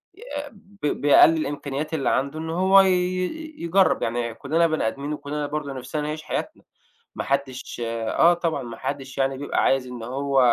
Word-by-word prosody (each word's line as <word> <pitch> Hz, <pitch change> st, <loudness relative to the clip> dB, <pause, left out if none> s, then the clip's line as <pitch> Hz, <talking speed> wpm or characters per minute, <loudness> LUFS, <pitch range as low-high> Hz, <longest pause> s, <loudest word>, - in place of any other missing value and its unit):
ي 400 Hz, -, -17 dB, 0.3 s
ب 200 Hz, -4 st, -11 dB, 0.2 s
بأقل 155 Hz, +3 st, +6 dB
الإمكانيات 145 Hz, +1 st, -3 dB
اللي 145 Hz, -4 st, 0 dB
عنده، 140 Hz, +4 st, 0 dB
إن 160 Hz, 0 st, -5 dB
هو 190 Hz, +3 st, +5 dB
ي 190 Hz, -, +3 dB, 0.7 s
يجرب 185 Hz, +3 st, +2 dB
يعني، 115 Hz, 0 st, -1 dB
كلنا 160 Hz, +7 st, +1 dB
بني 155 Hz, -7 st, 0 dB
آدمين، 140 Hz, +5 st, -3 dB
وكلنا 145 Hz, 0 st, -4 dB
برضه 145 Hz, -2 st, -4 dB
نفسنا 135 Hz, +4 st, -4 dB
نعيش 155 Hz, +1 st, -4 dB
حياتنا، -, -, -4 dB, 0.5 s
ما -, -, -4 dB
حدش 135 Hz, -3 st, -2 dB
آه، 115 Hz, +9 st, +3 dB
طبعًا 165 Hz, -5 st, -2 dB
ما 115 Hz, -1 st, -7 dB
حدش، 135 Hz, +3 st, -5 dB
يعني، 135 Hz, 0 st, 0 dB
بيبقى 145 Hz, -, -1 dB
عايز 135 Hz, -1 st, +2 dB
إن 125 Hz, -2 st, -8 dB
هو 135 Hz, +3 st, -1 dB
145 Hz, 170 wpm, -24 LUFS, 135-160 Hz, 0.7 s, بأقل